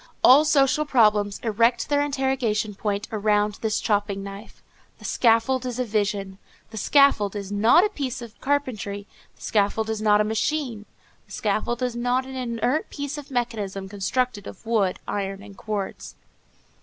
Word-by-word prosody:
All 280 +5 +8
social 295 0 +3
problems 210 -7 +2
erect 230 +2 +2
their 290 -1 +2
interrogation 265 -7 0
point 205 0 -3
around 210 -1 +1
this 220 -1 0
chopping 205 -2 -1
knife. 200 +2 -10 0.3
The - - -13
scaffold 235 +2 +2
is 250 -2 -4
a 255 - -1
vision. 200 -3 -2 0.3
The 220 - -8
scaffold 220 -5 +3
is 200 -1 -5
not 225 - +5
a - - 0
piece 270 - -4
of 235 -2 -11
carpentry; 230 -8 -2 0.3
the - - -24
scaffold 220 +1 0
is 220 -1 -3
not 210 -1 +4
a - - +4
machine; 225 0 -2 0.4
the - - -20
scaffold 230 +4 -1
is 250 -1 -1
not 245 +2 0
an 265 0 -8
inert 250 +3 -1
bit 285 -1 -5
of 290 - -11
mechanism 215 -6 -3
constructed 205 +2 -2
of 190 - -11
wood, 210 -5 +1
iron 195 0 -3
and 200 -1 -12
cords. 205 -1 -5
220 Hz, 160 wpm, -24 LUFS, 205-255 Hz, 0.4 s, All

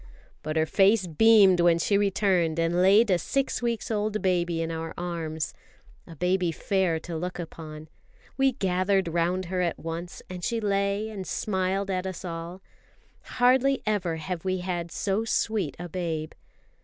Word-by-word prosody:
But 155 0 -4
her 160 0 +3
face 195 +4 +3
beamed 195 +2 +5
when 170 -1 +5
she 185 +5 +1
returned 190 -5 +2
and 165 +1 +1
laid 200 +3 +5
a 180 - +3
six 275 +8 -1
weeks 235 0 -2
old 215 0 -1
baby 175 -3 0
in 165 0 -2
our 165 0 -5
arms 165 -3 -3 0.5
a 165 - -11
baby 180 +1 +1
fair 180 -1 0
to 170 0 -6
look 180 +3 -4
upon. 155 -2 -8 0.5
We 270 -1 +2
gathered 190 -3 +1
round 175 +3 0
her 180 +1 -2
at 170 -2 -1
once, 165 +2 -6
and 180 -1 -8
she 230 +4 0
lay 200 0 0
and 195 -3 -6
smiled 195 0 -1
at 185 0 -2
us 185 0 -6
all. 170 +2 -6 0.7
Hardly 260 +2 +3
ever 195 -6 0
have 165 +1 -5
we 185 -1 -1
had 175 -2 -3
so 205 +2 -1
sweet 220 -7 -1
a 175 - -6
babe. 165 -3 -3
185 Hz, 165 wpm, -26 LUFS, 170-200 Hz, 0.7 s, beamed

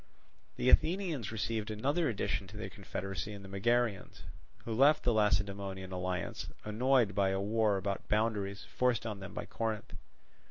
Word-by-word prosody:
The 125 - +1
Athenians 165 - +2
received 110 0 -2
another 140 +9 +1
addition 100 -3 -1
to 105 +3 -10
their 110 - -5
confederacy 95 -1 -5
in 100 -1 -9
the - - -9
Megarians; 115 +2 0 0.4
who 115 - -2
left 140 +6 +5
the 120 - +3
Lacedaemonian 100 -2 0
alliance, 90 -1 -3 0.2
annoyed 120 0 +3
by 95 0 +2
a 95 0 0
war 105 0 +2
about 100 +1 -3
boundaries 105 -2 0
forced 125 -3 0
on 105 -3 -4
them 95 -1 -8
by - - -4
Corinth. 110 -1 -3
105 Hz, 155 wpm, -33 LUFS, 100-115 Hz, 0.4 s, left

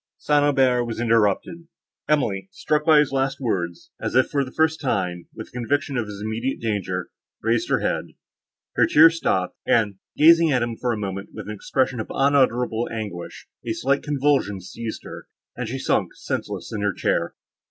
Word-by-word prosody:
—St. 145 -1 +2
Aubert 130 -4 +3
was 115 -1 -5
interrupted; 115 - +1 0.4
Emily, 100 -11 +1
struck 150 0 0
by 160 -2 +6
his 150 -2 +3
last 135 0 0
words, 85 -9 -3
as - - -3
if 130 - +3
for 140 -2 +1
the 130 - -8
first 160 0 +1
time, 90 - -2
with 110 - -9
a - - -26
conviction 140 +4 -1
of 115 -3 -1
his 105 0 -7
immediate 115 +5 -2
danger, 100 -5 -2 0.3
raised 115 +1 +1
her - - +2
head; - - -1 0.7
her - - +4
tears 165 +2 +6
stopped, 95 - 0
and, 105 -4 +1 0.2
gazing 165 +1 +6
at 125 -3 +2
him 120 -1 -3
for 125 +1 -1
a 115 - -1
moment 100 -1 -5
with - - -8
an 105 - -4
expression 130 +4 -1
of 110 - -4
unutterable 125 -4 +2
anguish, 105 -6 -6 0.2
a 115 - -2
slight 140 +5 0
convulsion 140 -8 +1
seized 110 +5 -7
her, - - -10 0.3
and 120 -2 -4
she 130 - -3
sunk 135 - 0
senseless - - -4
in 105 - -3
her 100 -1 +1
chair. - - -1
120 Hz, 185 wpm, -23 LUFS, 105-140 Hz, 0.7 s, by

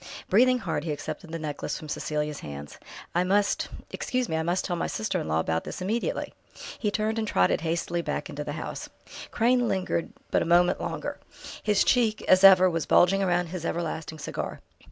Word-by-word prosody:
Breathing 250 +6 +5
hard, 165 -10 -3
he 160 - -2
accepted 160 +3 -6
the 165 - -3
necklace 155 -2 -4
from 155 - -9
Cecelia's 150 0 -2
hands. 70 0 -8 0.3
"I 175 - +2
must 200 +2 +1 0.2
excuse 255 -1 -1
me 160 - -2
I 160 - +1
must 175 +3 0
tell 175 - -1
my 170 - -1
sister 220 0 -2
in - - -5
law 80 0 +1
about 80 0 0
this - - -6
immediately!" 210 +6 -2 0.5
He 210 - 0
turned 215 +2 -1
and 220 - -2
trotted 90 - +2
hastily 170 +1 -1
back - - -3
into 150 -3 -5
the 145 - -5
house. 155 - -6 0.4
Crane 245 +1 +2
lingered 185 -4 -1 0.2
but - - +3
a - - 0
moment 175 +1 +4
longer. - - -4 0.4
His 210 -1 +3
cheek, 225 -3 +2
as 185 +1 +5
ever, 185 -1 +9
was 165 -3 -1
bulging 195 +2 +4
round 175 -2 +1
his 180 -1 -5
everlasting 160 -2 -3
cigar. 150 - -5
175 Hz, 195 wpm, -27 LUFS, 155-205 Hz, 0.5 s, ever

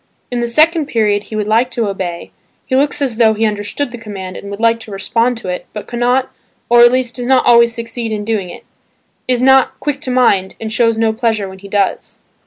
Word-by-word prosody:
In 245 - -2
the 240 - -1
second 310 +4 +3
period 210 -4 0
he 220 - -8
would 210 -1 -1
like 225 +4 +2
to 235 -4 -2
obey, 180 -3 -5 0.3
he 260 - -1
looks 285 +1 +1
as 245 -5 -2
though 220 -2 +4
he 220 +1 0
understood 210 +6 -3
the 240 - -8
command 195 -4 -7
and 200 - -8
would 200 0 -7
like 230 0 +2
to 220 - -11
respond 230 +5 0
to 190 - -6
it, 180 - -5
but 210 - -6
cannot,–or 245 0 0
at 240 0 +7
least 255 -1 -1
does 245 -1 -4
not 265 0 +3
always 235 -1 +5
succeed 230 0 -5
in 210 -1 -3
doing 210 -5 -2
it, - - -11 0.6
is 250 -1 +1
not 265 0 +4
"quick 285 0 -3
to 265 - -4
mind" 205 -7 +2
and 220 -1 -5
shows 230 -1 +2
no 225 -1 +1
pleasure 220 -3 -1
when 190 0 -11
he 200 - -11
does. 200 -1 -1
230 Hz, 225 wpm, -15 LUFS, 210-245 Hz, 0.6 s, at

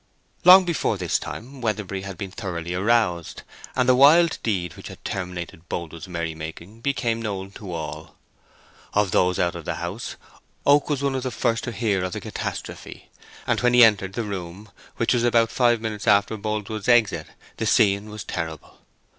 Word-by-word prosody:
Long 185 +1 +9
before 165 - 0
this 90 -3 0
time 130 +3 -8
Weatherbury 105 -4 -2
had 95 -2 -7
been 95 +1 -6
thoroughly 90 -5 -5
aroused, 95 -3 0 0.3
and 125 -1 +2
the 130 - +6
wild 150 +6 +6
deed 90 -7 -2
which - - -10
had - - -12
terminated 90 -3 -5
Boldwood's 85 +1 -5
merrymaking 85 +4 -6
became 120 -4 -1
known 100 -3 -4
to 100 -2 -9
all. 80 -3 -6 0.8
Of 105 -3 +2
those 90 0 +2
out 85 -1 +1
of 85 - -7
the - - -2
house 85 +7 -5 0.5
Oak 145 +1 +4
was 140 -2 -1
one 140 -1 +1
of 130 - -2
the 130 - -2
first 115 -1 0
to 120 - -3
hear 105 -4 0
of 90 -1 -3
the - - -3
catastrophe, - - -6 0.4
and - - +1
when 125 0 +3
he 125 - +9
entered 100 -4 +4
the 115 - -2
room, 100 0 -7 0.3
which - - +2
was 120 -1 +1
about 115 -1 +3
five 120 -2 +3
minutes 110 -1 -4
after 100 +1 +4
Boldwood's 110 0 -4
exit, 120 -4 +3 0.3
the - - -1
scene 100 0 +3
was 105 -2 -7
terrible. 80 -3 -6
105 Hz, 180 wpm, -24 LUFS, 90-120 Hz, 0.8 s, Long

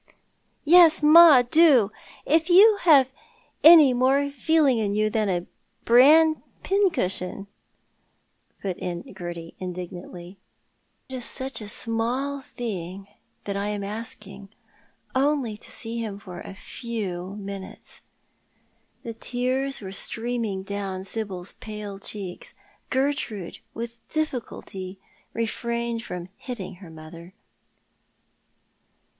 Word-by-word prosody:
" - - -44
Yes, 330 -4 +7
ma, 305 -4 +8
do. 255 -6 +5 0.3
If 320 +3 +2
you've 350 - +6 0.5
any 310 -5 +9
more 270 +3 +2
feeling 285 -2 +2
in 205 -2 -1
you 215 0 +1
than 215 -2 0
a 175 -1 -1 0.4
bran 305 +6 +6 0.2
pincushion," 195 - 0 1.2
put 190 -3 -3
in 175 -1 -4
Gerty, 175 -3 -7
indignantly. 180 0 -8 0.3
" - - -45
It 260 - -5
is 245 - -5
such 265 -2 -4
a 210 - -7
small 245 +5 -2
thing 195 -6 -6 0.3
that 200 - -4
I 200 +1 -2
am 205 -1 -3
asking. 205 -2 -7 0.6
Only 270 -4 +1
to - - -6
see 230 0 -3
him 215 -3 -4
for 180 -3 -10
a 195 - -9
few 200 -5 -6
minutes." 200 -2 -8 1.0
The 230 - -6
tears 255 +4 -1
were 190 -2 -7
streaming 225 -1 -1
down 195 -1 -5
Sibyl's 195 -3 -5
pale 210 -2 -7
cheeks. 195 -3 -7 0.3
Gertrude 260 - -2 0.2
with 235 0 -6
difficulty 230 -10 -5 0.4
refrained 235 0 -3
from 180 -4 -7
hitting 220 -9 -7
her 180 - -11
mother. 165 +3 -12
225 Hz, 110 wpm, -25 LUFS, 195-265 Hz, 1.2 s, any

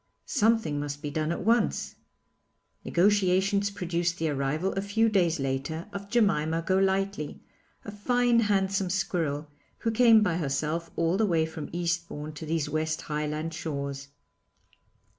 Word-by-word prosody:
Something 220 - +2
must 145 +1 -5
be 145 - -3
done 155 +2 -1
and - - +1
at 180 - -5
once. 230 +2 +1 0.9
Negotiations 195 +1 +2
produced 175 -3 -2
the 160 -1 0
arrival 150 +6 -1
a 195 - -1
few 220 +3 +2
days 175 -6 +2
later 135 +5 -3
of 200 0 -6
Jemima 165 -8 +2
Golightly, 190 -3 0 0.5
a - - -6
fine 240 +3 +2
handsome 195 -3 +1
squirrel, 170 -6 -1 0.3
who 225 - 0
came 225 -1 +6
by 175 -5 +1
herself 155 +2 -2
all 165 +2 +1
the 220 0 +2
way 165 -3 +2
from 160 -1 -7
Eastbourne 170 -3 -3
to 155 +1 -8
these 160 -1 0
West 155 +1 -1
Highland 150 +1 -3
shores. 140 -3 -4
170 Hz, 140 wpm, -28 LUFS, 155-200 Hz, 0.9 s, came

